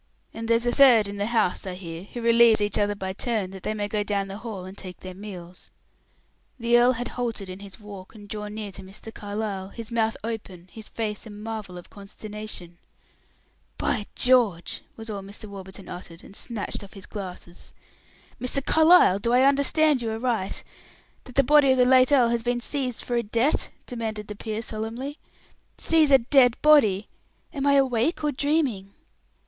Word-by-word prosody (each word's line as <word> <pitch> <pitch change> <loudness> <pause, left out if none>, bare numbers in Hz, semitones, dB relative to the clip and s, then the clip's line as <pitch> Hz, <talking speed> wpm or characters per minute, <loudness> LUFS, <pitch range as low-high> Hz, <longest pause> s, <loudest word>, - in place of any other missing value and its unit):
And 225 0 -6
there's 230 +1 +2
a 240 - +2
third 240 -6 +6
in 200 0 -6
the 200 +1 -1
house, 220 -5 0
I 185 - -4
hear, 170 -1 -8
who 235 +3 -8
relieves 230 -1 +6
each 205 0 +1
other 205 0 +1
by 190 -1 -4
turn, 210 -3 -2
that 190 -1 -9
they 215 - -3
may 205 -1 -2
go 210 0 -1
down 205 -1 -1
in - - -9
the 195 +2 -7
hall 210 -6 -6
and 190 +1 -9
take 185 -2 -10
their 185 0 -8
meals." 180 -3 -10 0.9
The 235 0 +2
earl 245 +1 +5
had 245 0 -4
halted 230 -6 -4
in 185 +1 -8
his 200 +2 -11
walk 205 -1 -11
and 205 -1 -12
drawn 210 0 -6
near 210 -2 -5
to 190 - -10
Mr. 195 +4 -11
Carlyle, 205 -2 -4
his 230 +3 -8
mouth 225 -1 0
open, 195 -6 -6
his 220 -1 -10
face 215 -1 -4
a - - -9
marvel 210 -3 -7
of 175 - -12
consternation. 205 -3 -9 1.0
"By 210 -4 -1
George!" 235 -9 +2
was 225 0 -9
all 200 -2 -5
Mr. 200 +3 -9
Warburton 195 -1 -10
uttered, 175 -2 -9
and 195 - -13
snatched 220 -3 -4
off 195 - -12
his 195 -2 -10
glasses. 180 -3 -9 0.7
"Mr. 260 +2 -1
Carlyle, 315 - +6
do 235 +3 0
I 250 +1 +5
understand 280 +1 +4
you 230 - -2
aright 225 -4 -2 0.6
that 255 - -12
the 275 - +5
body 290 +1 +5
of - - -1
the 250 - +5
late 255 +1 +5
earl 250 -5 +5
has 235 0 0
been 240 +1 -1
seized 255 -1 -2
for 245 - -2
a - - +2
debt?" 235 +6 0 0.2
demanded 220 -4 -5
the 210 - -5
peer, 220 +1 -4
solemnly. 230 +7 -5 0.6
"Seize 320 -2 +3
a 275 - +8
dead 245 -1 +4
body! 220 -10 +5 0.5
Am 280 -1 -1
I 280 - +5
awake 270 +3 +1
or 300 - +1
dreaming?" 265 -9 0
220 Hz, 190 wpm, -25 LUFS, 200-245 Hz, 1.0 s, a